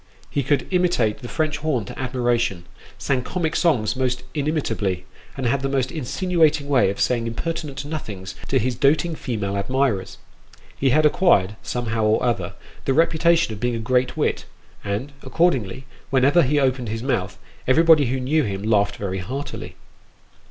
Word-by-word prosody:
He 140 - 0
could 135 0 +1
imitate 175 - +1
the 120 - -8
French 155 +2 -1
horn 145 -8 -1
to - - -9
admiration, 120 -7 0 0.3
sang 135 -2 0
comic 165 +3 -2
songs 115 - +2
most 130 -1 -1
inimitably, 115 - -1 0.3
and 135 - -3
had 130 +3 +1
the 135 - -1
most 135 -2 0
insinuating 155 +1 +1
way 135 -6 +4
01 100 - -2
saying 115 -2 +1
impertinent 145 +2 -4
nothings 105 - -6
to 135 - +1
his 125 +1 0
doting 150 +7 +2
female 110 -9 -3
admirers. 110 0 -1 0.6
He 135 - +1
had 155 +4 +4
acquired, 125 - +3
somehow 115 -2 -2
or 110 +1 +2
other, 120 -2 -1 0.3
the 135 - +1
reputation 165 -3 +3
of 105 - -8
being 120 +2 0
a - - -3
great 125 +3 0
wit, - - 0 0.4
and, 105 +8 -3
accordingly, 130 - 0 0.2
whenever 135 +6 +4
he 145 +1 +2
opened 130 -4 0
his 115 +2 -4
mouth, 100 -8 -1 0.3
everybody 155 +1 +5
who 130 +2 -1
knew 145 +5 +1
him 100 -6 -3
laughed 100 -2 +2
very 95 -2 -3
heartily. 130 +10 -6
130 Hz, 160 wpm, -22 LUFS, 110-150 Hz, 0.6 s, everybody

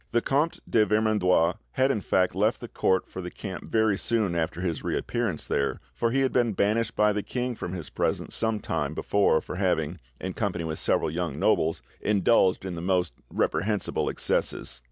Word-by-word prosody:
The 120 - +2
Comte 150 +4 +1
de 110 - +4
Vermandois 105 -6 +2 0.2
had 130 +1 +3
in 110 - -1
fact 90 -1 +2
left - - +1
the - - -7
court 95 -1 +1
for 95 - -7
the 90 - -5
camp 95 0 -7
very 110 -3 +2
soon 110 -6 +1
after 85 0 -1
his 85 -4 -2
reappearance - - -2
there, 70 - -1
for 115 - 0
he 135 +3 +1
had 135 - +1
been 120 -3 +2
banished 105 +3 +1
by 105 0 +3
the 105 - -1
king 125 +3 -3
from 90 -5 -5
his 85 -5 -6
presence - - -1
some 110 -2 0
time - - -2
before 100 -6 +2
for - - -6
having, 90 -3 0 0.2
in 95 0 -4
company 90 -6 -2
with 80 -1 -3
several - - +2
young 85 0 -3
nobles, 80 +1 +1 0.2
indulged 100 -2 +3
in 95 - -3
the 85 - -5
most 90 -5 +1 0.2
reprehensible 105 +2 0
excesses. - - -1
100 Hz, 190 wpm, -27 LUFS, 90-110 Hz, 0.2 s, de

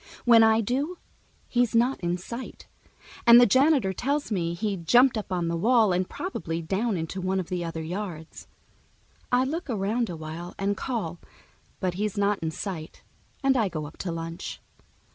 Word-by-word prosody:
When 235 -2 +7
I 220 0 +5
do, 275 - -2 0.5
he's 245 -2 +1
not 245 +4 +3
in 175 0 -1
sight, 235 +7 -8 0.6
and 235 0 +10
the 245 - +8
janitor 260 -3 +3
tells 280 +6 -1
me 170 -4 -1
he 200 +3 -1
jumped 240 +10 +4
up 210 -3 -4
on 175 -2 0
the 170 - -1
wall 220 +2 +3
and 180 +1 0
probably 165 - -4
down 195 +5 -1
into 165 +4 -4
one 190 +1 0
of 180 - -5
the 180 -2 -2
other 165 -1 -4
yards. 170 -2 -6 0.8
I 250 +1 +4
look 315 +5 -3
around 220 +2 0
a 175 - -4
while 160 +3 -7
and 200 +1 0
call, 195 -9 -3 0.6
but 185 -2 -1
he's 210 +3 -2
not 200 0 +1
in 160 - -2
sight, 160 -1 -6 0.4
and 270 0 +4
I 220 -6 +2
go 155 -3 -4
up 145 - -11
to 180 - -4
lunch. 165 0 -6
195 Hz, 180 wpm, -26 LUFS, 170-240 Hz, 0.8 s, and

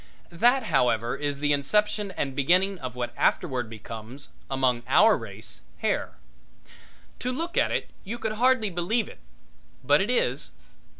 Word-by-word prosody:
That, 240 +10 +3
however 120 -1 +1
is 145 0 -2
the 145 +1 +1
inception 210 +8 +1
and 135 -2 -2
beginning 180 +7 +2
of 130 -2 -6
what 120 -1 -3
afterward 130 -9 +1
becomes, 115 +4 -7 0.2
among 130 -3 +1
our 220 +1 +6
race, - - -8 0.2
hair. - - -1 1.1
To 250 - -2
look 330 +7 -4
at - - +3
it - - -2
you 220 +4 -5
could 220 -2 -2
hardly 230 -1 +2
believe 185 +6 0
it, - - -12 0.6
but 145 +5 +4
it 200 - -1
is. 250 - 0
170 Hz, 145 wpm, -26 LUFS, 130-215 Hz, 1.1 s, our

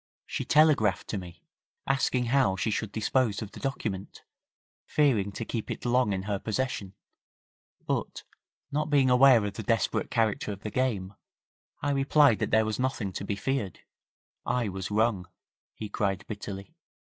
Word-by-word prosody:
'She - - -3
telegraphed 150 -11 +3
to - - -3
me, 90 -2 -11 0.4
asking 130 -2 +1
how 120 -5 +3
she 100 +4 -1
should 105 0 -2
dispose 110 0 0
of 105 - -9
the - - -10
document, 105 -8 -4 0.6
fearing 120 -10 +2
to 115 - -5
keep 115 -1 -4
it - - -5
long 125 -2 +3
in 95 -1 -2
her 100 -1 -2
possession, 110 -4 -3 0.9
but - - -2 0.5
not 150 +2 -1
being 135 -3 +4
aware 125 -3 +6
of 100 - -3
the - - -5
desperate 115 -6 0
character 110 -2 0
of 100 -1 -7
the 105 - -4
game, 105 -7 -1 0.7
I 145 - +1
replied 140 -3 +4
that - - -1
there 110 0 +4
was 110 +2 -2
nothing 125 -7 -1
to - - -4
be 100 0 -2
feared. 105 -2 -2 0.6
I 120 -4 0
was 95 -1 -5
wrong,' 105 -3 +1 0.5
he 110 - -5
cried, 100 -1 -1
bitterly. 100 -2 -7
110 Hz, 160 wpm, -28 LUFS, 100-130 Hz, 0.9 s, aware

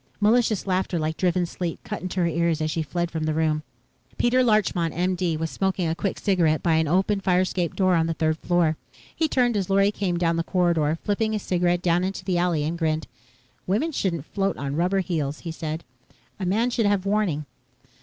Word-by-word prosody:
Malicious 220 -1 +2
laughter, 185 -2 0
like 155 0 -1
driven 180 0 +1
sleet, 170 0 -4
cut - - -5
into 185 0 -2
her - - +3
ears 170 -1 +1
as 155 0 -1
she 165 - -1
fled 170 +3 -2
from 160 -1 -2
the 155 -1 0
room. 155 -1 +1 0.6
Peter 250 +2 +3
Larchmont, 200 -8 +1
M.D., 180 -1 0
was 160 0 -3
smoking 190 -2 0
a 160 - 0
quick 190 +3 -2
cigarette 170 -6 +1
by 170 - +3
an 160 0 +2
open 190 +5 +2
fire 180 -1 +3
escape 180 -3 -1
door 185 -2 +3
on 165 -1 +2
the 165 - -2
third 160 0 0
floor. 170 -3 +1 0.4
He 320 - +1
turned 245 -5 +2
as 195 -2 -1
Lorry 195 +1 +4
came 190 -4 -1
down 170 -1 +1
the 165 - 0
corridor, 165 -4 +1
flipped 205 +1 -1
his 220 -2 0
cigarette 175 -1 +1
down 175 0 +2
into 185 -1 -4
the 180 -3 +1
alley 175 -4 +1
and 165 +3 -3
grinned. 155 -1 0 0.6
"Women 225 - +1
shouldn't 170 - -2
float 195 +2 -1
on 140 0 -3
rubber 180 +4 +1
heels," 155 -5 -3
he 165 - -5
said. 160 0 -5 0.6
"A 185 - -2
man 225 +6 +1
should 230 -3 +1
have 200 -2 +1
warning." 195 -8 0
175 Hz, 210 wpm, -24 LUFS, 160-195 Hz, 0.6 s, Lorry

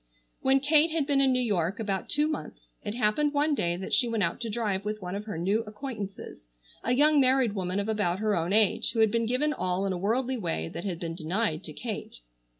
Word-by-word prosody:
When 265 +1 +4
Kate 300 +3 +4
had 315 -3 0
been 280 -1 +2
in 270 -1 +4
New 255 - +2
York 195 -4 0
about 200 -3 -2
two 295 +1 +2
months - - -6
it 205 - -4
happened 250 +6 +1
one 295 +1 +2
day 175 -10 0
that 190 - -6
she 245 - +3
went 225 -3 0
out 170 +7 -1
to 230 - -3
drive 210 -3 -1
with 210 +1 -3
one 180 -2 -6
of 205 +1 -4
her 210 -6 -5
new 195 +6 +1
acquaintances, 210 -3 -7 0.4
a 245 - +1
young 300 +2 +5
married 260 -4 +3
woman 185 -1 -2
of 200 - -2
about 205 -5 0
her 215 0 +1
own 170 +2 -1
age, 215 0 +2
who 230 - -2
had 220 -2 +4
been 230 -1 0
given 285 +6 +1
all 185 -5 -1
in 195 - 0
a 180 - -4
worldly 245 +6 0
way 80 - -2
that 170 - -7
had 180 -4 -3
been 165 -2 -4
denied 170 +1 -1
to 155 - -7
Kate. 215 - -6
215 Hz, 240 wpm, -28 LUFS, 185-260 Hz, 0.4 s, young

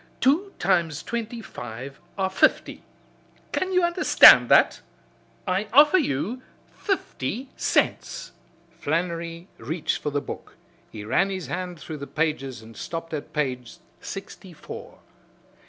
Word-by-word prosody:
Two 335 +10 +2
times 170 -5 +1
twenty 235 0 -4
five 130 +5 -8 0.2
are 190 -1 0
fifty! - - +2 0.7
Can 375 - -1
you 365 -1 +3
understand 345 +2 +7
that? - - +5 0.7
I 190 +3 0
offer 295 +8 +7
you 230 - -2 0.3
fifty 260 - -3
cents." - - 0 0.5
Flannery 170 +2 -2
reached 155 +8 -2
for 150 - -1
the 145 0 -1
book. 140 - -9 0.4
He 105 -1 -8
ran 195 - +2
his 190 -2 -4
hand 180 -2 -5
through 155 0 -7
the 140 0 -7
pages 135 -7 -2
and 110 0 -13
stopped 165 +4 -6
at 150 - -5
page 130 -5 -3 0.2
sixty 195 -2 -8
four. 150 - -10
170 Hz, 125 wpm, -25 LUFS, 145-220 Hz, 0.7 s, understand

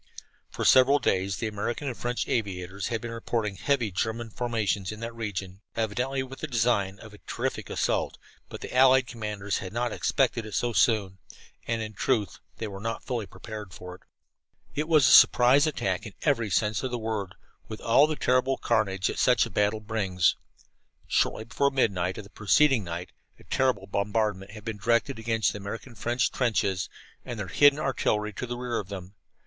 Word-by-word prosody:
For - - -4
several 130 +2 +6
days 95 -7 0
the - - -3
American 110 +6 -3
and 125 - -2
French 120 +1 -2
aviators 95 -3 -2
had 115 -2 -2
been 120 - -5
reporting 115 -3 -2
heavy 125 -5 0
German 110 +4 -2
formations 105 -5 -1
in 105 - -8
that 115 0 -5
region, 100 -4 -5
evidently 125 +5 -1
with 135 0 -10
the 155 - -4
design 110 -6 +1
of 110 0 -13
a 105 - -14
terrific - - -3
assault, - - -1 0.3
but - - -8
the - - -7
allied 130 0 +6
commanders 105 -4 -3
had 95 -2 -6
not 120 0 -1
expected 125 -2 +1
it 110 -2 -7
so 120 -1 0
soon, 100 -5 +2 0.5
and 115 -1 -1
in 110 0 -7
truth 105 -4 0 0.2
they 115 - -4
were 100 -1 -7
not 115 +2 -4
fully 120 -6 -3
prepared 105 -5 -9
for 90 0 -9
it. 90 - -14 0.7
It 150 +2 -2
was 155 -5 +5
a - - +5
surprise 130 +6 +7
attack 95 -11 -1
in 100 - -12
every 120 -7 +1
sense 105 0 +1
of 130 - -2
the 125 - -2
word, 110 -4 -3 0.3
with 110 - -7
all 135 +6 +5
the 155 - -2
terrible 130 0 +2
carnage 100 -5 0
that - - 0
such - - +4
a - - -9
battle 105 +1 +1
brings. 100 -5 +1 0.7
Shortly - - +1
before 120 +5 +1
midnight 95 -9 0
of 110 - -6
the 100 - -16
preceding 125 +3 +3
night 85 0 -6 0.3
a - - -18
terrible 130 -1 0
bombardment 100 -1 -1
had 105 -1 -11
been 110 -2 -4
directed 115 +4 +1
against 115 -1 +1
the 105 - -6
American 115 +5 -7
French 120 +3 0
trenches, 100 -7 0 0.3
and 120 -3 -6
their 100 -3 -4
hidden 145 +9 +5
artillery 105 -7 0
to 125 - -5
the 120 0 -4
rear 120 -1 -2
of 100 - -7
them. 95 -1 -7
110 Hz, 190 wpm, -27 LUFS, 100-125 Hz, 0.7 s, surprise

